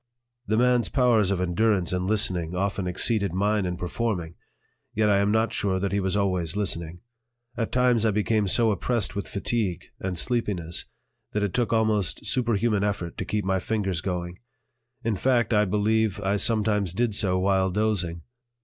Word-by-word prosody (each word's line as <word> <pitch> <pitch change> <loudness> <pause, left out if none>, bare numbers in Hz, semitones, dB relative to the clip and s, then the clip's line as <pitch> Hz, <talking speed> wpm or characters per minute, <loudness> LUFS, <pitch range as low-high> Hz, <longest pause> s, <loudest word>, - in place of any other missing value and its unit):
The 110 - +1
man's 125 0 +3
powers 120 -7 +3
of 100 -2 0
endurance 90 0 +1
in 90 0 -1
listening 90 -5 0
often 95 0 -1
exceeded 100 +1 +1
mine 100 0 +1
in 90 0 -3
performing 90 -2 -3 0.6
yet 105 -1 +3
I 100 - +4
am 100 +1 +2
not 110 0 +1
sure 95 -2 0
that 100 +1 -2
he 100 - 0
was 95 +1 0
always 95 -3 0
listening. 85 -4 -2 0.5
At 115 - -2
times 125 -3 +2
I 110 - +3
became 105 0 +1
so 115 +3 +3
oppressed 105 +1 -1
with 100 - -4
fatigue 100 -3 -2
and 95 -2 -3
sleepiness 95 -7 0 0.5
that 105 - 0
it 100 - -1
took 120 -3 0
almost 110 -7 +1
superhuman 115 -4 +1
effort 100 -5 -2
to - - -3
keep 105 -2 -2
my 95 0 +1
fingers 95 -3 -2
going; 90 -1 -4 0.6
in 110 -3 -1
fact, 120 0 +1
I 105 -1 +4
believe 105 +1 +1
I 100 0 0
sometimes 105 -4 +1
did 115 +2 0
so 100 -3 +1
while 95 0 +2
dozing. 90 -5 -1
100 Hz, 170 wpm, -25 LUFS, 90-110 Hz, 0.6 s, I